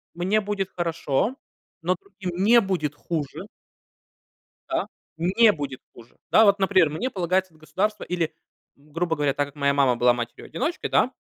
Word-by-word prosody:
мне 190 +5 +1
будет 200 -2 -2
хорошо, 170 - -1 0.5
но 180 +2 +2
другим 190 -2 -5
не 235 +3 +7
будет 175 -8 -2
хуже. 150 -2 -4 1.2
Да, - - 0 0.3
не 190 +7 +4
будет 140 -5 -5
хуже. 120 0 -16
Да, 220 - +7
вот, 200 -1 +5
например, 190 -5 +3
мне 230 - -2
полагается 185 -2 -1
от 155 - -23
государства 210 +7 -2
или, 170 -3 -2 0.4
м, 145 +1 -24
грубо 165 +1 -1
говоря, 145 -2 +1
так 145 -1 -1
как 140 - -16
моя 140 -1 +2
мама 135 -3 +3
была 120 +1 +4
матерью-одиночкой, 125 - -4
да? - - +3
175 Hz, 160 wpm, -24 LUFS, 145-195 Hz, 1.2 s, не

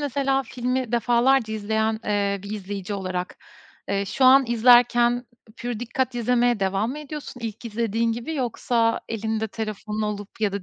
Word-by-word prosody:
mesela, 275 -1 0
filmi 250 -1 -3
defalarca 240 0 +3
izleyen, 220 +1 -1
eee, 200 -1 0
bir 200 - -8
izleyici 205 -1 -5
olarak, 185 -2 -4 0.5
eee, 200 0 0
şu 260 +7 0
an 265 +1 +7
izlerken, 240 +1 +4 0.3
pür 240 -2 -4
dikkat 255 +1 -2
izlemeye 240 -1 +2
devam 195 +4 0
mı 285 - -5
ediyorsun 300 -3 -8
ilk 225 0 -6
izlediğin 230 0 0
gibi, 240 +8 -5
yoksa 235 -3 0
elinde 220 0 -2
telefonun 215 0 -4
olup 210 0 -5
ya 210 -2 +1
da 200 -1 -4
230 Hz, 155 wpm, -24 LUFS, 210-245 Hz, 0.5 s, an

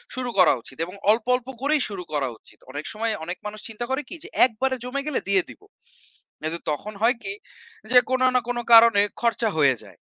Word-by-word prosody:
শুরু 255 -1 -3
করা 180 - +7
উচিত। 130 - -12
এবং 180 - -11 0.2
অল্প, 220 +1 +1
অল্প 250 0 -6
করেই 295 +1 +2
শুরু 190 -3 -6
করা 145 -3 0
উচিত। - - -22
অনেক 145 +2 -6
সময় 225 +1 -1
অনেক 175 +2 -5
মানুষ 210 +1 -6
চিন্তা 225 +2 -5
করে 265 +2 0
কি - - -7
যে, 385 - -9 0.2
"একবারে 260 +2 -1
জমে 255 +3 -3
গেলে 300 - -1
দিয়ে 195 -2 +4
দিবো।" 410 - -14 0.8
কিন্তু 160 +2 -3
তখন 210 +8 -5
হয় 235 +4 +4
কি? 390 - -3 0.6
যে 250 - +6
কোন 260 0 0
না - - +6
কোন 245 0 -2 0.2
কারণে 230 -3 +8 0.2
খরচা 235 -1 +1
হয়ে 140 -4 +4
যায়। - - -16
225 Hz, 210 wpm, -24 LUFS, 185-255 Hz, 0.8 s, কারণে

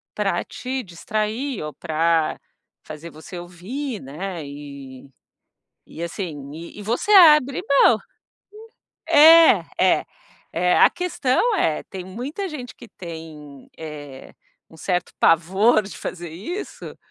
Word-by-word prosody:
pra - - 0
te 260 0 -5
distrair 215 - -3
ou 150 -2 -6
para 160 +2 0 0.4
fazer 155 +2 -9
você 160 +3 -11
ouvir, 205 +9 -6
né. 160 +4 -6
E 140 -2 -10 0.8
e 165 - -8
assim 155 -6 -6
e 170 +5 -10
e - - -7
você 235 - -1
abre 300 -8 +7
mão. 275 -5 +5 1.1
É, 325 +2 +7 0.4
é, - - -11 0.5
é. 180 +2 +2
A - - +7
questão 360 - 0
é 155 - 0
tem 185 -2 -8
muita 265 - -5
gente 255 -5 -8
que 240 - -14
tem, 160 -5 -11
eh, 145 -4 -9 0.3
um 160 - -17
certo 180 +1 -2
pavor 190 +7 +3
de 200 - -9
fazer 175 -1 -6
isso, 225 - -7
180 Hz, 125 wpm, -22 LUFS, 160-255 Hz, 1.1 s, abre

